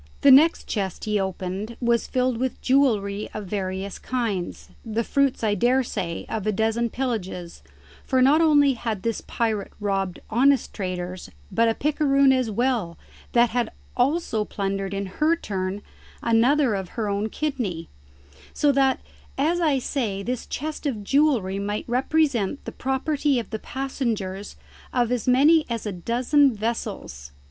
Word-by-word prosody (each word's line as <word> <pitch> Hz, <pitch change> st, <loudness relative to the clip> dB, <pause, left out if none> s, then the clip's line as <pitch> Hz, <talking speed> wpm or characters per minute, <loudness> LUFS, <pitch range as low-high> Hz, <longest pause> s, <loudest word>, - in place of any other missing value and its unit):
The 280 Hz, -, +7 dB
next 310 Hz, +5 st, +6 dB
chest 195 Hz, -5 st, -3 dB
he 210 Hz, -1 st, +1 dB
opened 190 Hz, +4 st, -4 dB
was 235 Hz, -1 st, +1 dB
filled 255 Hz, -2 st, 0 dB
with 260 Hz, 0 st, -2 dB
jewellery 215 Hz, -7 st, +1 dB
of 215 Hz, -1 st, -4 dB
various 190 Hz, 0 st, -4 dB
kinds, 225 Hz, -8 st, -3 dB
the 225 Hz, 0 st, -1 dB
fruits, 275 Hz, 0 st, +1 dB
I 210 Hz, -2 st, +2 dB
daresay, 240 Hz, -6 st, 0 dB
of 215 Hz, -2 st, -3 dB
a -, -, +3 dB
dozen 225 Hz, +3 st, 0 dB
pillages, 200 Hz, -9 st, -4 dB, 0.4 s
for 260 Hz, -, +1 dB
not 280 Hz, +5 st, +5 dB
only 290 Hz, -4 st, +5 dB
had 225 Hz, -5 st, -4 dB
this 230 Hz, -1 st, -1 dB
pirate 220 Hz, -3 st, -2 dB
robbed 195 Hz, -3 st, -1 dB
honest 265 Hz, +4 st, +2 dB
traders 185 Hz, -2 st, -5 dB, 0.2 s
but 230 Hz, 0 st, +3 dB
a 225 Hz, -, 0 dB
picaroon 280 Hz, -2 st, +3 dB
as 255 Hz, -3 st, +1 dB
well 225 Hz, -6 st, 0 dB, 0.4 s
that 240 Hz, -1 st, +4 dB
had 240 Hz, -1 st, 0 dB, 0.3 s
also 255 Hz, -4 st, +1 dB
plundered 195 Hz, -1 st, -3 dB
in 200 Hz, 0 st, -2 dB
her 305 Hz, -, +1 dB
turn 195 Hz, -, -4 dB, 0.4 s
another 240 Hz, +3 st, +3 dB
of 190 Hz, +2 st, -5 dB
her 220 Hz, -2 st, 0 dB
own 205 Hz, +2 st, -1 dB
kidney; 225 Hz, -, -3 dB, 0.7 s
so 290 Hz, -, +3 dB
that, 270 Hz, -1 st, +2 dB, 0.4 s
as 320 Hz, +6 st, +1 dB
I 300 Hz, -5 st, +3 dB
say, 225 Hz, -7 st, -2 dB
this 245 Hz, +3 st, -3 dB
chest 305 Hz, +1 st, -4 dB
of 220 Hz, -7 st, -3 dB
jewellery 240 Hz, -7 st, +2 dB
might 205 Hz, +1 st, -3 dB
represent 265 Hz, -2 st, +1 dB
the -, -, -5 dB
property 275 Hz, +1 st, 0 dB
of 235 Hz, -, -4 dB
the 220 Hz, -, -3 dB
passengers 225 Hz, -8 st, -3 dB, 0.4 s
of 245 Hz, -2 st, +1 dB
as 245 Hz, -2 st, -1 dB
many 295 Hz, +6 st, +5 dB
as 230 Hz, -2 st, -3 dB
a 210 Hz, -, -2 dB
dozen 245 Hz, -, +2 dB
vessels. 205 Hz, -, -4 dB
230 Hz, 150 wpm, -24 LUFS, 200-270 Hz, 0.7 s, The